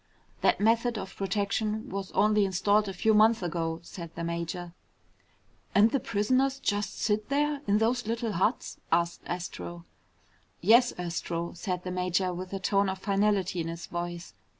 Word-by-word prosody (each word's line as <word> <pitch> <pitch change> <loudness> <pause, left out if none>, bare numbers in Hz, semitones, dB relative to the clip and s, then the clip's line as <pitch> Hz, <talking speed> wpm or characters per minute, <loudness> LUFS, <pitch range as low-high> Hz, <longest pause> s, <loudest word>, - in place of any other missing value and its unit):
"That - - +3
method 230 +2 +2
of 190 -2 -6
protection 210 +2 -1
was 195 0 -4
only 210 0 +4
installed 200 +2 +2
a - - -2
few 220 +4 +2
months 215 -1 +5
ago," 165 -1 -2
said 170 -1 -8
the 170 - -4
major. 170 +1 -4 1.0
"And 215 +3 +6
the 275 - +2
prisoners 255 +6 +1
just 205 -1 -1
sit 215 +1 0
there 290 0 +1
in 205 +1 +4
those 230 +1 +1
little 230 0 -1
huts?" 200 +6 -1
asked 170 +1 +1
Astro. 175 -1 -5 0.7
"Yes, 240 +2 +5
Astro!" 170 -1 -3
said 180 0 -3
the 180 - -4
major 180 0 0
with 185 +1 -6
a 195 - -3
tone 200 +1 +2
of 190 - -3
finality 195 -2 +1
in 165 - -3
his 165 0 -6
voice. 175 0 -5
195 Hz, 160 wpm, -28 LUFS, 175-215 Hz, 1.0 s, And